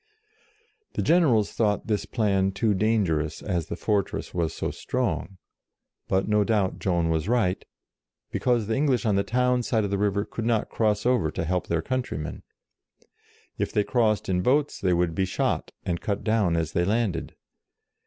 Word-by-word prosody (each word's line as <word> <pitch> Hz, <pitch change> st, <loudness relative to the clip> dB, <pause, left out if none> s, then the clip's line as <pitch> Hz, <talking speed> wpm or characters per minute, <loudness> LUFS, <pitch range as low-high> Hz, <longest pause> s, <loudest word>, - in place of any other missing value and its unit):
The -, -, -1 dB
generals 150 Hz, -, +3 dB
thought 105 Hz, -3 st, 0 dB
this 105 Hz, -3 st, -1 dB
plan 95 Hz, -3 st, +1 dB
too 105 Hz, +2 st, +1 dB
dan 110 Hz, +1 st, +2 dB
gerous, 75 Hz, -2 st, -2 dB
as 85 Hz, -5 st, -2 dB
the -, -, -4 dB
fortress 100 Hz, +2 st, -1 dB
was 85 Hz, -3 st, 0 dB
so -, -, -3 dB
strong; 120 Hz, -6 st, -2 dB, 0.7 s
but 95 Hz, 0 st, +1 dB
no 105 Hz, -1 st, +3 dB
doubt 100 Hz, -3 st, 0 dB
Joan 85 Hz, -3 st, +1 dB
was 80 Hz, +1 st, 0 dB
right, 115 Hz, -7 st, +1 dB, 0.7 s
because 120 Hz, -3 st, +1 dB
the 110 Hz, -, -1 dB
English 135 Hz, -4 st, +1 dB
on 105 Hz, -, +2 dB
the 100 Hz, -, +3 dB
town 125 Hz, +2 st, +1 dB
side 115 Hz, -2 st, 0 dB
of 100 Hz, -, -2 dB
the 100 Hz, -, 0 dB
river 100 Hz, 0 st, +1 dB
could 115 Hz, -, -5 dB
not 115 Hz, -3 st, +1 dB
cross 105 Hz, -2 st, 0 dB
over 125 Hz, -10 st, +2 dB
to 80 Hz, -, -3 dB
help 90 Hz, +2 st, -1 dB
their 85 Hz, -1 st, 0 dB
countrymen. 120 Hz, -, -3 dB, 1.2 s
If -, -, -1 dB
they 105 Hz, -, +2 dB
crossed 110 Hz, -4 st, +1 dB
in 90 Hz, -1 st, +1 dB
boats, 145 Hz, +8 st, +1 dB
they 95 Hz, -2 st, +2 dB
would 85 Hz, -1 st, +1 dB
be 95 Hz, +3 st, +1 dB
shot, 95 Hz, -, -1 dB
and 85 Hz, -2 st, -2 dB
cut 100 Hz, -1 st, -2 dB
down 110 Hz, -6 st, +2 dB
as 80 Hz, -1 st, -1 dB
they 85 Hz, -, +1 dB
landed. 105 Hz, 0 st, -1 dB
105 Hz, 175 wpm, -26 LUFS, 90-115 Hz, 1.2 s, generals